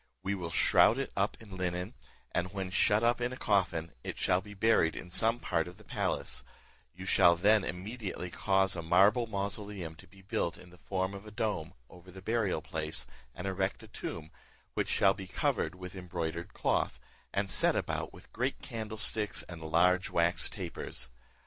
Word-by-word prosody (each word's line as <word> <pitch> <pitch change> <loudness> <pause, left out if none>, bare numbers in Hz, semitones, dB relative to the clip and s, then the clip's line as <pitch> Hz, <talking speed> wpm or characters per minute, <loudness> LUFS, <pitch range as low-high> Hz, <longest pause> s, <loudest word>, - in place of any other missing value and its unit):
We 95 +1 0
will 90 -4 -3
shroud 105 +7 +5
it 135 - -2
up 100 +1 0
in 105 -4 -10
linen, 90 +3 -2 0.4
and 90 +1 -1
when 95 -2 -4
shut 105 +2 +3
up 120 +1 +3
in 120 +1 0
a 130 - -6
coffin, 90 -7 +1
it - - -5
shall 90 0 +2
be 105 +1 -11
buried 100 -6 +3
in 90 - -8
some 115 +5 +2
part 85 -7 0
of 90 - -10
the - - -15
palace; - - -2 0.5
you 90 +1 -8
shall 85 -2 +6
then 105 +4 +4
immediately 95 -1 -4
cause 95 0 +2
a 85 - -3
marble 100 +8 +4
mausoleum 100 -4 -3
to 95 - -14
be 95 +2 -18
built, 100 -4 -1
in 90 - -14
the 90 - -17
form 95 0 -2
of 100 +2 -9
a - - -9
dome, 105 -8 -2
over 90 +3 -15
the 95 +1 -10
burial 110 0 0
place, - - -1 0.3
and 90 - -6
erect 95 0 -1
a - - -11
tomb, 80 -1 -6 0.4
which - - -1
shall 95 -1 +4
be 95 -1 -8
covered 85 -2 0
with 90 0 -8
embroidered 85 -1 -4
cloth, - - 0 0.3
and 100 0 0
set - - +5
about - - -2
with - - -16
great 130 +3 -1
candlesticks 110 -3 +1
and 85 -2 -8
large 90 +4 +3
wax 85 +2 +2
tapers. 85 - -5
95 Hz, 185 wpm, -32 LUFS, 90-105 Hz, 0.5 s, shall